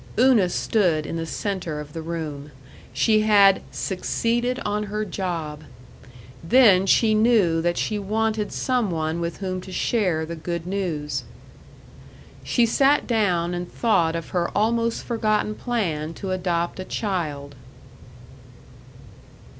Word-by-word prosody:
Una 235 -6 +4
stood 175 -7 +1
in - - -5
the 165 0 -3
center 180 -5 -3
of 150 0 -9
the 165 - -5
room. 155 -3 -5 0.4
She 215 - +3
had 200 -2 +5
"succeeded 235 +6 -1
on 210 +1 -1
her 210 +1 -3
job." 165 -6 -4 0.8
Then 195 -1 +5
she 220 +2 +4
knew 215 -7 +3
that 175 +1 0
she 210 -1 -1
wanted 215 +1 -1
some 250 -5 0
one 160 0 -2
with 170 0 -3
whom 185 -2 -4
to 190 - -10
share 180 -6 0
the 170 +1 -6
good 170 +1 -4
news. 175 -6 -3 1.2
She 240 - +2
sat 275 +5 +3
down 180 -7 +1
and 175 0 -5
thought 170 -8 +1
of 165 -1 -5
her 175 -2 -1
almost 230 +2 +1
forgotten 215 -2 0
plan 165 -10 -2
to 195 - -5
adopt 175 -1 -1
a - - -3
child. 155 -11 -3
185 Hz, 130 wpm, -23 LUFS, 165-215 Hz, 1.2 s, had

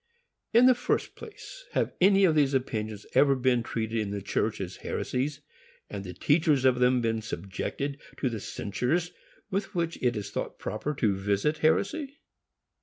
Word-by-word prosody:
In 235 +2 +6
the 255 - +8
first 245 - -1
place, 465 +2 -11
have - - 0
any 195 +1 +6
of 165 - +4
these 145 -3 +3
opinions 110 -5 -2
ever 140 -1 +5
been 125 -2 +2
treated 115 -1 -2
in 105 -2 -2
the 100 0 -3
church - - -1
as - - -5
heresies, 140 +3 -2 0.5
and 100 -2 -5
the 90 - -6
teachers 145 - +2
of 125 -1 +4
them 125 0 +4
been 115 -1 0
subjected 135 +7 -4 0.2
to 135 - 0
the 115 -3 -2
censures 125 - -2 0.4
with 195 +1 -2
which 170 -1 -1
it 125 -1 +2
is 100 -1 -5
thought - - -4
proper 140 +8 -3
to 105 -6 +1
visit 100 +10 0
heresy? 270 - +1
130 Hz, 170 wpm, -28 LUFS, 110-165 Hz, 0.5 s, the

